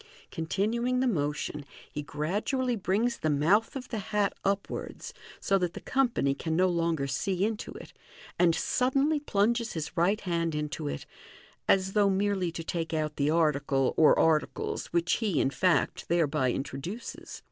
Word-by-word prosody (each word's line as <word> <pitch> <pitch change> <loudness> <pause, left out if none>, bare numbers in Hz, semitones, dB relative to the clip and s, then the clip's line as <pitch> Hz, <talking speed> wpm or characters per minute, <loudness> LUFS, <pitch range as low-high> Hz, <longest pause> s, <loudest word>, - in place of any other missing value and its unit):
Continuing 225 +9 0
the 260 - +2
motion, 150 - -1 0.3
he 150 - -4
gradually 205 - -1
brings 215 +4 0
the 155 - 0
mouth 170 - +2
of 255 -2 -6
the 225 - -3
hat 205 0 0
Upwards, 200 0 -3 0.3
so 195 0 +2
that 175 -2 -2
the - - -5
company 245 - +1
can 160 +3 -3
no 185 +2 +3
longer 165 -4 0
see 180 +8 0
into 220 -1 -3
it, - - -11 0.5
and 170 -2 +4
suddenly 275 - +1
plunges 235 -3 +1
his 160 +1 -5
right 195 +5 +2
hand 170 -3 -1
into 150 - -3
it, 70 0 -4 0.6
as 190 0 +3
though 205 -2 +4
merely 195 -2 0
to 165 0 -6
take 165 -1 -3
out 155 -1 -2
the 140 +1 +2
article 145 -4 +2
or 155 - +6
articles 160 -2 +1
which 170 0 +1
he, 205 -9 0
in 135 - +2
fact, 180 +6 +1
thereby 155 -6 +2
introduces. 140 - -6
175 Hz, 160 wpm, -29 LUFS, 155-210 Hz, 0.6 s, or